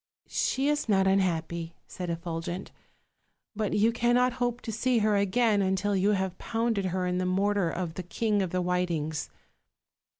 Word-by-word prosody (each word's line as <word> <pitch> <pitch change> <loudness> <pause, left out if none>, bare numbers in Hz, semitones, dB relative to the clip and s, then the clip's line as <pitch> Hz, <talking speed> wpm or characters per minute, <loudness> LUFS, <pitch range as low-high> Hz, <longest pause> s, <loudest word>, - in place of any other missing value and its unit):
"She 270 +2 0
is 295 -5 0
not 190 -2 +4
unhappy," 170 -3 0
said 180 -1 -6
Effulgent, 170 +2 -4 0.8
"but 210 -1 -1
you 220 +3 +4
can 240 +1 +2
not 250 0 +3
hope 245 0 0
to 225 - -5
see 240 +3 +1
her 215 -1 +3
again 205 +2 +2
until 190 +1 +1
you 195 +2 +3
have 190 -2 -2
pounded 225 -3 -1
her 185 0 -1
in 180 0 0
the 185 - 0
mortar 195 -1 +1
of 170 -1 -3
the 185 - -5
King 205 +4 0
of 185 - -1
the 180 +1 -1
Whitings." 170 -4 -1
190 Hz, 170 wpm, -28 LUFS, 180-220 Hz, 0.8 s, not